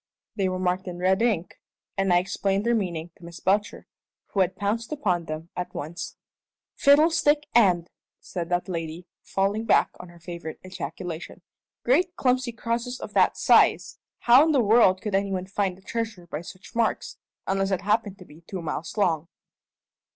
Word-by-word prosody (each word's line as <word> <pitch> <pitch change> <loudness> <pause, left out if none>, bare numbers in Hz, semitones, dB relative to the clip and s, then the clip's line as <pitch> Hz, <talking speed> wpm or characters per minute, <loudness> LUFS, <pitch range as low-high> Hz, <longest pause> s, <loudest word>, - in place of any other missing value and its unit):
They 195 -3 +1
were 185 - -2
marked 185 +1 -1
in 175 -1 -5
red 190 +3 +2
ink, 210 -8 0 0.4
and 195 -1 +1
I 175 - +6
explained 195 +2 0
their 235 - +3
meaning 175 -6 -2
to - - -20
Miss 170 0 -10
Belcher, 205 +2 0 0.4
who 200 - -2
had 185 0 +2
pounced 215 +5 -2
upon 185 - 0
them 155 +2 -6
at 180 - -5
once. 160 +4 -6 0.6
"Fiddlestick 295 0 +4
end!" 180 -7 +4 0.3
said 170 -3 -5
that 175 0 0
lady, 165 -1 -5 0.2
falling 200 +3 -1
back - - +4
on 180 - -10
her 175 - -15
favourite 170 -2 -7
ejaculation. 170 -1 -7 0.4
"Great 345 +8 +2
clumsy 255 -2 +1
crosses 235 +2 -3
of - - -8
that - - +3
size! - - +4 0.2
How 245 +4 +7
in 315 0 +2
the 265 -4 +4
world 205 -3 +4
could 210 - -3
any 195 0 +1
one 185 -1 -2
find 195 -1 -2
a - - -19
treasure 220 -4 -4
by 155 -2 -5
such 185 +2 -12
marks, 230 -1 -1 0.3
unless 195 0 0
it 190 -2 0
happened 205 -1 0
to 180 - -13
be 155 +1 -16
two 185 -3 -5
miles 160 +4 -5
long?" 165 -5 +1
190 Hz, 175 wpm, -25 LUFS, 175-225 Hz, 0.6 s, How